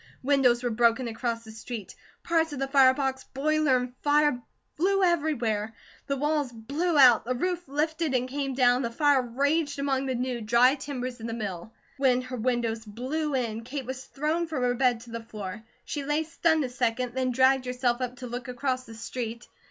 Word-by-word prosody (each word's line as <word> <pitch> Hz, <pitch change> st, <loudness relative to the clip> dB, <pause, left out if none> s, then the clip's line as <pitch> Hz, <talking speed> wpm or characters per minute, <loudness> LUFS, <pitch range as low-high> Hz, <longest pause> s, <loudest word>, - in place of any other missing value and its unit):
Windows 255 Hz, -3 st, +3 dB
were 245 Hz, -, 0 dB
broken 235 Hz, +2 st, +2 dB
across 230 Hz, 0 st, -3 dB
the 220 Hz, -, -11 dB
street. 220 Hz, -1 st, -7 dB, 0.3 s
Parts 325 Hz, -1 st, +1 dB
of -, -, -5 dB
the 270 Hz, +1 st, -1 dB
fire 270 Hz, -2 st, +5 dB
box, 265 Hz, -1 st, -2 dB
boiler, 300 Hz, -1 st, +1 dB
and 250 Hz, 0 st, -4 dB
fire 295 Hz, -3 st, +3 dB, 0.3 s
flew 390 Hz, +4 st, +2 dB
everywhere. 240 Hz, -, 0 dB, 0.3 s
The 275 Hz, -, -1 dB
walls 295 Hz, -1 st, 0 dB
blew 290 Hz, +9 st, -1 dB
out, 250 Hz, -5 st, +7 dB
the 255 Hz, +2 st, -2 dB
roof 355 Hz, +4 st, -2 dB
lifted 310 Hz, +1 st, -1 dB
and 255 Hz, 0 st, +1 dB
came 275 Hz, 0 st, -3 dB
down, 250 Hz, -1 st, +4 dB
the 235 Hz, -, -1 dB
fire 285 Hz, +2 st, +3 dB
raged 285 Hz, +5 st, 0 dB
among 275 Hz, -1 st, 0 dB
the 260 Hz, -, -1 dB
new, 245 Hz, -1 st, -2 dB
dry 235 Hz, +4 st, +5 dB
timbers 255 Hz, -3 st, -5 dB
of 225 Hz, -, -5 dB
the 230 Hz, -, -4 dB
mill. 210 Hz, -3 st, -5 dB, 0.3 s
When 255 Hz, -2 st, +3 dB
her 255 Hz, 0 st, -6 dB
windows 230 Hz, -1 st, -1 dB
blew 265 Hz, +8 st, -3 dB
in, 230 Hz, -3 st, -2 dB
Kate 265 Hz, +2 st, -5 dB
was 260 Hz, +1 st, -6 dB
thrown 310 Hz, +4 st, -1 dB
from 300 Hz, -6 st, -2 dB
her 245 Hz, 0 st, +2 dB
bed 245 Hz, -2 st, +2 dB
to 235 Hz, 0 st, -12 dB
the 230 Hz, 0 st, -5 dB
floor. 210 Hz, -3 st, -7 dB, 0.2 s
She 290 Hz, -, -4 dB
lay 295 Hz, +3 st, 0 dB
stunned 320 Hz, -1 st, +1 dB
a 255 Hz, -, -3 dB
second, 245 Hz, -1 st, -1 dB
then 260 Hz, 0 st, 0 dB
dragged 260 Hz, +1 st, +3 dB
herself 250 Hz, 0 st, 0 dB
up 250 Hz, 0 st, -3 dB
to 250 Hz, -, -8 dB
look 245 Hz, +2 st, -6 dB
across 255 Hz, 0 st, -2 dB
the 225 Hz, -2 st, -11 dB
street. 235 Hz, 0 st, -5 dB
255 Hz, 200 wpm, -27 LUFS, 240-285 Hz, 0.3 s, out